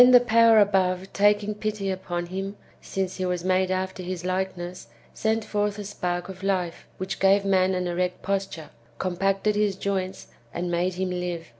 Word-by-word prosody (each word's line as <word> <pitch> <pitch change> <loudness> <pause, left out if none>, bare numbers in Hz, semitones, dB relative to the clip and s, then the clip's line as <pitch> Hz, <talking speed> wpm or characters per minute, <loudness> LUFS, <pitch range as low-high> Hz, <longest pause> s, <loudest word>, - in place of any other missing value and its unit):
the 250 - +10
power 230 -2 +5
above 190 -2 +2
taking 205 +1 +3
pity 210 -2 -2
upon 175 -2 -3
him, 195 +3 -4 0.3
since 190 -1 -3
he 185 - -1
was 180 -1 -2
made 185 0 +2
after 185 0 -2
his 180 -1 -5
Hkeness, 185 -4 -3 0.3
sent 220 0 0
forth 205 -1 -1
a 205 - -5
spark 175 -3 -3
of 190 -1 -9
life, 185 -3 -1
which 185 +1 -4
gave 195 +1 +4
man 190 -1 +3
an 180 0 -1
erect 180 +1 -2
posture, 195 -5 -3 0.3
compacted 195 +3 0
his 205 -2 +1
joints, 190 -1 -3 0.2
and 175 +1 -3
made 175 +1 0
him 185 0 -2
Hve. 180 -2 -3
190 Hz, 170 wpm, -25 LUFS, 180-200 Hz, 0.3 s, the